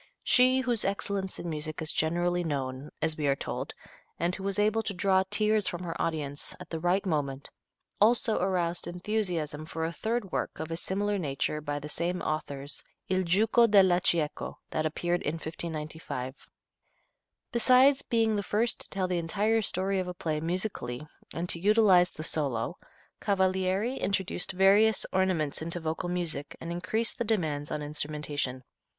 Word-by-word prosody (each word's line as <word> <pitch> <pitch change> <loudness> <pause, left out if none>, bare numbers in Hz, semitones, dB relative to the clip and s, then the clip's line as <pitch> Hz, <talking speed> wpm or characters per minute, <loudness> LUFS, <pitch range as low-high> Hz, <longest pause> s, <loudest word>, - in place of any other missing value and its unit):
She 255 +1 +5
"whose 240 -4 0
excellence 195 -1 -2
in - - -6
music 155 0 -3
is 160 -1 -1
generally 175 +2 +1
known," 135 -2 -3
as 160 -1 +1
we 150 - +1
are 135 - +3
told, - - -5 0.4
and 175 +2 +1
who 190 - -8
was 195 0 -2
able 215 +2 +3
to 205 -3 -4
"draw 190 +1 +3
tears 210 0 +2
from 175 +1 -3
her 165 -2 -4
audience" 145 -3 -2
at 180 -1 -11
the 165 - -2
right 180 +4 +1
moment, 145 -5 -2 0.5
also 220 +1 +4
aroused 175 -3 0
enthusiasm 175 -5 -2
for 160 +1 -3
a 165 - -3
third 220 0 -2
work - - -2
of 160 +1 -5
a - - -1
similar 200 +4 -1
nature 150 -1 -2
by 145 -1 -3
the 145 +1 -6
same 170 +4 -2
authors, 145 -2 -3 0.3
"Il 185 0 +2
Giuco 220 +6 +4
della 190 -3 +5
Cieco," 160 -4 0
that 155 - 0
appeared 175 +3 -1
in 150 - -2
1595. 155 -5 -5 1.0
Besides 255 +4 +5
being 225 -2 +1
the 205 - 0
first 220 +4 0
to - - -6
tell 190 -1 -1
the 180 -1 0
entire 210 +7 +1
story 195 -1 0
of 185 - -2
a 180 - -5
play 155 -3 -2
musically 160 - -3 0.2
and 170 +2 -3
to 170 - +1
utilize 195 -3 +5
the 155 - -8
solo, 135 -8 -1 0.5
Cavalieri 190 +4 +1
introduced 190 -1 0
various 200 +3 +5
ornaments 185 -7 +1
into 170 +2 -3
vocal 160 +2 -3
music 170 -5 -3
and 165 - -6
increased 200 +7 -1
the - - +2
demands 155 -10 -1
on 150 - -3
instrumentation. 145 -3 -2
175 Hz, 165 wpm, -29 LUFS, 155-200 Hz, 1.0 s, She